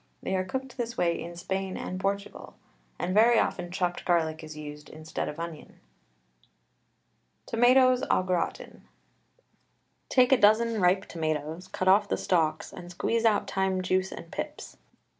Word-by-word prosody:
They 190 - -1
are 185 - +1
cooked 260 +8 -5
this 235 -1 -4
way 170 -1 +1
in 170 +1 -7
Spain 190 +2 -3
and 185 - -5
Portugal, 200 +1 -4 0.4
and 185 - -2
very 230 +3 +5
often 180 -4 0
chopped 180 0 -2
garlic 160 -2 0
is 155 -1 -9
used 150 0 -9
instead 155 +1 -5
of 150 - -8
onion. 170 -2 -8 1.7
TOMATOES 255 +2 +4
AU - - +3
GRATIN. 180 -2 -3 1.3
Take 255 0 +4
a 265 - +7
dozen 220 +1 +4
ripe 185 +2 +3
tomatoes, 155 +2 -3
cut 185 -1 -3
off 200 +2 +5
the - - 0
stalks, 160 -4 0
and 175 -1 -9
squeeze 230 +6 -1
out 215 -2 +3
time 190 -1 0
juice 185 +1 0
and 165 - -9
pips. 300 +8 -6
185 Hz, 150 wpm, -28 LUFS, 170-215 Hz, 1.7 s, a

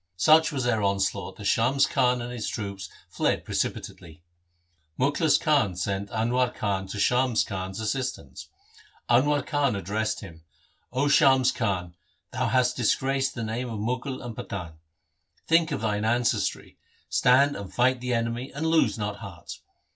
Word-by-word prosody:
Such 155 - +5
was 135 -4 -2
their 115 -3 +1
onslaught 100 -1 -1
that 105 - -10
Shams 125 +6 +3
Khan 125 -1 +1
and 120 - -6
his 115 -3 -3
troops 100 -3 -5 0.2
fled - - -1
precipitately. 85 0 -4 0.8
Mukhlis 145 +3 +3
Khan 140 - +2
sent 100 +3 -3
Anwar 120 +3 0
Khan 95 -2 -2
to 100 - -6
Shams 125 +1 +2
Khan's 95 0 -5
assistance. 125 +4 -4 0.6
Anwar 140 +3 +3
Khan 140 -6 +1
addressed 105 +3 -2
him, 80 -6 -12 0.3
' - - -42
0 140 +3 +2
Shams 130 -3 +5
Khan, 95 -6 -2 0.4
thou 130 -1 -1
hast 125 +1 +2
disgraced 135 +3 0
the 120 - -4
names 115 +3 -3
of 115 - -5
Mughal 125 +5 -3
and 120 -2 -6
Pathan. 85 -8 -6 0.7
Think 165 0 +3
of 140 - -2
thine 105 -1 -1
ancestry, 110 -2 -1 0.3
stand 140 +3 +4
and 100 -2 -7
fight 125 0 +2
the 125 -1 -1
enemy, 115 +3 -2
and 150 +3 -4
lose 160 -5 +2
not 105 -1 -3
heart. - - -9
120 Hz, 155 wpm, -26 LUFS, 100-130 Hz, 0.8 s, Such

